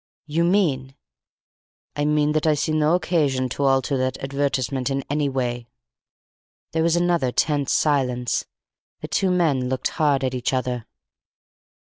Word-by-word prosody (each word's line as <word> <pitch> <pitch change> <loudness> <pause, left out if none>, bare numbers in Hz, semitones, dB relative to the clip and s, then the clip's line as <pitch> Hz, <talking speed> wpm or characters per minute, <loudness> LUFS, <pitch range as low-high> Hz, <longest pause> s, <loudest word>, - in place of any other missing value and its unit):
'" - - -84
"You 160 +3 0
mean 150 -8 +1 0.5
" - - -64
"I 145 - 0
mean 150 0 +2
that 155 +1 0
I 155 - +4
see 150 - -1
no 155 +2 +3
occasion 150 -7 0
to 140 +3 -2
alter 135 0 +2
that 130 0 -1
advertisement 135 -1 -1
in 135 0 -2
any 145 -1 +1
way." 120 -3 -3 1.0
There 160 - 0
was 165 0 +2
another 175 -7 +1
tense 145 +2 0
silence. 125 -5 +1 0.6
The - - -5
two 190 - +1
men 155 -8 +1
looked 130 0 -1
hard 145 -4 +1
at 130 -1 -1
each 125 +1 -2
other. 125 -3 -2
140 Hz, 155 wpm, -23 LUFS, 130-155 Hz, 1.0 s, I